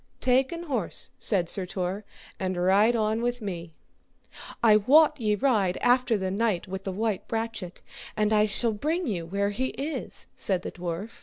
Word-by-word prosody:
Take 260 Hz, +1 st, +2 dB
an 340 Hz, 0 st, -5 dB
horse, 250 Hz, -, -2 dB
said 185 Hz, -5 st, +1 dB
Sir 185 Hz, +1 st, +1 dB
Tor, 185 Hz, +3 st, -3 dB, 0.4 s
and 185 Hz, -1 st, -2 dB
ride 200 Hz, +6 st, +4 dB
on 220 Hz, 0 st, 0 dB
with 245 Hz, +1 st, -1 dB
me. 175 Hz, -6 st, -5 dB, 0.9 s
I 215 Hz, -2 st, +7 dB
wot 300 Hz, +7 st, +5 dB
ye 210 Hz, -1 st, +2 dB
ride 210 Hz, -7 st, +1 dB
after 245 Hz, -2 st, +3 dB
the 190 Hz, -1 st, -2 dB
knight 205 Hz, -2 st, 0 dB
with 190 Hz, +1 st, -6 dB
the 195 Hz, -, -2 dB
white 215 Hz, 0 st, -2 dB
brachet, 225 Hz, -5 st, -4 dB, 0.3 s
and 215 Hz, 0 st, +2 dB
I 210 Hz, 0 st, +4 dB
shall 225 Hz, +2 st, 0 dB
bring 315 Hz, -, -1 dB
you 180 Hz, -, -3 dB
where 200 Hz, +3 st, 0 dB
he 255 Hz, +6 st, -1 dB
is, 290 Hz, +4 st, -4 dB
said 185 Hz, -2 st, -1 dB
the -, -, -5 dB
dwarf. 180 Hz, +5 st, -6 dB
210 Hz, 175 wpm, -27 LUFS, 190-245 Hz, 0.9 s, I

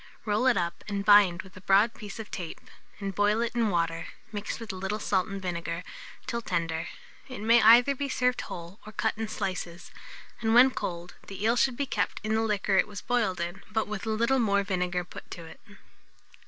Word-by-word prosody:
Roll 215 Hz, +4 st, +1 dB
it 250 Hz, -, +4 dB
up 170 Hz, -1 st, -2 dB
and 200 Hz, -1 st, -3 dB
bind 200 Hz, -4 st, +6 dB
with 190 Hz, -, -16 dB
a 185 Hz, -, -11 dB
broad 200 Hz, +5 st, +4 dB
piece 205 Hz, -3 st, -9 dB
of 220 Hz, -2 st, -8 dB
tape, 175 Hz, -4 st, -6 dB, 0.4 s
and 195 Hz, -1 st, -4 dB
boil 205 Hz, +3 st, +2 dB
it 235 Hz, 0 st, -1 dB
in 235 Hz, -2 st, +1 dB
water, 165 Hz, -2 st, -1 dB, 0.2 s
mixed 205 Hz, +1 st, -4 dB
with 225 Hz, -4 st, -6 dB
a -, -, -7 dB
little 190 Hz, +3 st, -2 dB
salt 190 Hz, -3 st, 0 dB
and 195 Hz, 0 st, -5 dB
vinegar, 170 Hz, -1 st, -4 dB, 0.4 s
till 235 Hz, -, -3 dB
tender. 165 Hz, -5 st, -2 dB, 0.4 s
It 255 Hz, -4 st, -7 dB
may 230 Hz, +2 st, +5 dB
either 240 Hz, +5 st, +7 dB
be 280 Hz, +1 st, -3 dB
served 250 Hz, -1 st, +1 dB
whole 175 Hz, +4 st, -8 dB
or 215 Hz, -, -11 dB
cut 220 Hz, 0 st, 0 dB
in 225 Hz, 0 st, -3 dB
slices; 185 Hz, -4 st, -5 dB, 0.5 s
and 225 Hz, -1 st, +1 dB
when 255 Hz, +2 st, +8 dB
cold, 175 Hz, -6 st, -5 dB
the 195 Hz, +1 st, -7 dB
eel 230 Hz, +2 st, +3 dB
should 245 Hz, 0 st, +2 dB
be 280 Hz, -, 0 dB
kept -, -, -1 dB
in 215 Hz, 0 st, -1 dB
the 220 Hz, -, +2 dB
liquor 205 Hz, -3 st, +1 dB
it -, -, +3 dB
was 205 Hz, -1 st, -7 dB
boiled 220 Hz, -7 st, 0 dB
in, 175 Hz, +3 st, -4 dB
but 220 Hz, 0 st, 0 dB
with 210 Hz, +1 st, -5 dB
a -, -, 0 dB
little 235 Hz, +4 st, +2 dB
more 200 Hz, -3 st, +2 dB
vinegar 180 Hz, -2 st, -1 dB
put 175 Hz, -, -12 dB
to 170 Hz, -, -8 dB
it. 160 Hz, -, -13 dB
205 Hz, 215 wpm, -28 LUFS, 185-225 Hz, 0.5 s, when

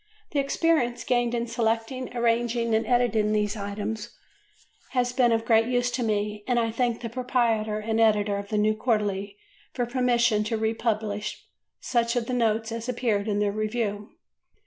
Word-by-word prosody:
The 290 Hz, -, 0 dB
experience 275 Hz, -4 st, +1 dB
gained 240 Hz, 0 st, +1 dB
in 235 Hz, 0 st, -1 dB
selecting, 235 Hz, +2 st, -2 dB
arranging, 235 Hz, 0 st, +1 dB
and 220 Hz, +1 st, +1 dB
editing 230 Hz, -4 st, +2 dB
these 210 Hz, 0 st, 0 dB
items 210 Hz, +1 st, -4 dB, 0.8 s
has 245 Hz, -1 st, +1 dB
been 250 Hz, -2 st, +3 dB
of 225 Hz, 0 st, +1 dB
great 225 Hz, -1 st, +4 dB
use 245 Hz, 0 st, +1 dB
to 250 Hz, -, -2 dB
me 210 Hz, -2 st, -1 dB
and 245 Hz, -1 st, +1 dB
I 230 Hz, -1 st, +1 dB
thank 235 Hz, 0 st, -1 dB
the 235 Hz, -, -3 dB
proprietor 230 Hz, -3 st, 0 dB
and 220 Hz, +1 st, 0 dB
editor 210 Hz, -2 st, +3 dB
of 200 Hz, 0 st, -6 dB
the 215 Hz, -, -1 dB
New 215 Hz, +1 st, +2 dB
Quarterly 205 Hz, -3 st, -1 dB, 0.4 s
for 245 Hz, -, -1 dB
permission 240 Hz, -3 st, +2 dB
to 225 Hz, +1 st, -1 dB
republish 220 Hz, -1 st, -2 dB, 0.4 s
such 235 Hz, -1 st, 0 dB
of 240 Hz, -2 st, 0 dB
the 255 Hz, -, -3 dB
notes 225 Hz, -2 st, +1 dB
as 230 Hz, +2 st, -4 dB
appeared 225 Hz, -4 st, 0 dB
in 205 Hz, -1 st, 0 dB
their 205 Hz, -1 st, +1 dB
review. 215 Hz, -1 st, -2 dB
230 Hz, 170 wpm, -26 LUFS, 215-240 Hz, 0.8 s, great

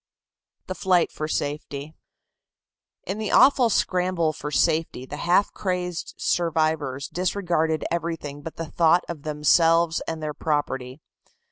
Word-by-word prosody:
THE 185 Hz, -, -4 dB
FLIGHT 185 Hz, -2 st, +2 dB
FOR 155 Hz, -, -4 dB
SAFETY. 145 Hz, 0 st, -4 dB, 1.1 s
In 195 Hz, +4 st, -4 dB
the 215 Hz, -, -2 dB
awful 260 Hz, -3 st, +5 dB
scramble 180 Hz, -5 st, +1 dB
for 150 Hz, -, -6 dB
safety 150 Hz, -1 st, 0 dB
the 145 Hz, -, -7 dB
half 180 Hz, +5 st, +2 dB
crazed 180 Hz, -3 st, -3 dB
survivors 155 Hz, -5 st, 0 dB
disregarded 175 Hz, -4 st, -1 dB
everything 165 Hz, -4 st, -3 dB
but 160 Hz, +2 st, -8 dB
the 165 Hz, -, -4 dB
thought 170 Hz, +2 st, +3 dB
of 165 Hz, -4 st, -6 dB
themselves 165 Hz, +3 st, +3 dB
and 160 Hz, -1 st, -3 dB
their 155 Hz, -1 st, -4 dB
property. 140 Hz, -3 st, -2 dB
160 Hz, 125 wpm, -24 LUFS, 150-175 Hz, 1.1 s, awful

